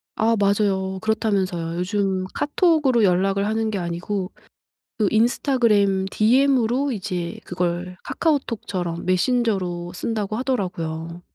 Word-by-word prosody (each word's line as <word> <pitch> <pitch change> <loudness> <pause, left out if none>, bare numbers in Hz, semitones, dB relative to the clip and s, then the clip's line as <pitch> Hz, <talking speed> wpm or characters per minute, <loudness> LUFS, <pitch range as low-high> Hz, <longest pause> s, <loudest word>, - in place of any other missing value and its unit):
아 225 +1 +2
맞아요. 195 -2 +1
그렇다면서요. 190 -6 -1
요즘 190 0 -1
카톡으로 295 -7 +2
연락을 195 +1 +2
하는 220 +1 0
게 210 - -2
아니고 180 +2 -3 0.7
그 210 -3 +3
인스타그램 220 -5 +2
디엠으로 260 +3 +2
이제 180 -5 -4
그걸 180 0 -3
카카오톡처럼 205 - -2
메신저로 185 -3 0
쓴다고 215 +2 -3
하더라고요. 175 -9 -3
200 Hz, 300 characters per minute, -22 LUFS, 180-230 Hz, 0.7 s, 그